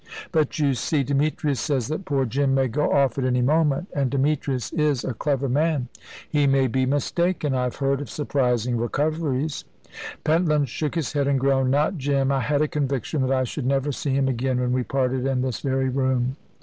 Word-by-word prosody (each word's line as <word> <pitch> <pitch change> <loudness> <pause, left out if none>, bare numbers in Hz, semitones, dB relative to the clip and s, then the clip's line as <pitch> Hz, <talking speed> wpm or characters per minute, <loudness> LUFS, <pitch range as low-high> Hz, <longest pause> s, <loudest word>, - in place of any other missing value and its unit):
"But 160 -3 +1
you 145 -3 +2
see, 140 +3 0
Demetrius 140 0 0
says 135 -6 -1
that 155 +5 -4
poor 140 -5 0
Jim 135 +3 +1
may 135 -1 +2
go 145 +5 0
off 135 -2 +2
at - - -1
any 125 -1 +1
moment 150 +3 +2
and 140 -3 0
Demetrius 135 -2 -1
is 150 -5 +1
a 130 - -2
clever 140 +3 -1
man." 145 -1 0 0.4
"He 145 -2 +2
may 135 -1 +3
be 130 +1 0
mistaken. 150 +2 0
I 125 -1 0
have 125 - -3
heard 140 0 0
of 145 - -7
surprising 125 -5 0
recoveries." 145 +3 -1 0.6
Pentland 155 -4 +2
shook 150 +6 -3
his 160 -3 -2
head, 140 -2 +1
and 140 -1 +2
groaned. 135 -1 +2
"Not 150 +6 +1
Jim. 135 0 +1
I 135 - +1
had 145 +3 +1
a - - +1
conviction 140 0 -2
that 130 0 0
I 130 -1 +2
should 130 +1 -4
never 135 +1 +1
see 135 0 -2
him 135 -1 +2
again 130 0 0
when 125 0 0
we 130 - +1
parted 130 0 -1
in 130 -1 0
this 130 -3 -2
very 135 -1 0
room." 130 -1 0
135 Hz, 200 wpm, -24 LUFS, 130-150 Hz, 0.6 s, may